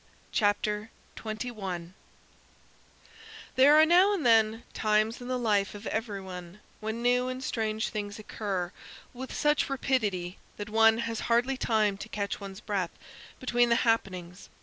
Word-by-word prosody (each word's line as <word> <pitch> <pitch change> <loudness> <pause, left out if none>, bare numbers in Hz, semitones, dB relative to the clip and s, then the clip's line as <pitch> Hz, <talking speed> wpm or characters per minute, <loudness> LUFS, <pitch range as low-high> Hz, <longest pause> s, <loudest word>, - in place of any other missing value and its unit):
CHAPTER 210 0 +1 0.3
21 210 -6 -5 1.6
There 275 +3 +7
are 310 +1 +8
now 365 +5 +5
and 335 - -3
then 225 -1 +4
times 215 +2 +1
in 245 - -7
the 255 0 -1
life 210 -4 +1
of 205 +2 -9
every 220 -2 -2
one 180 0 -9 0.2
when 220 +2 -4
new 250 +1 +3
and 255 +1 -4
strange 220 -3 -1
things 205 -1 -4
occur 195 -4 -3 0.4
with 260 +1 -7
such 295 -1 +1
rapidity 210 -10 -1 0.2
that 205 0 -6
one 225 0 +5
has 230 -1 -3
hardly 245 +3 +3
time 215 -5 +1
to 215 - -7
catch 200 -2 -3
one's 195 -1 -8
breath 195 -5 -1 0.5
between 240 -1 +2
the 235 - +4
happenings. 185 -5 -1
220 Hz, 145 wpm, -29 LUFS, 200-245 Hz, 1.6 s, are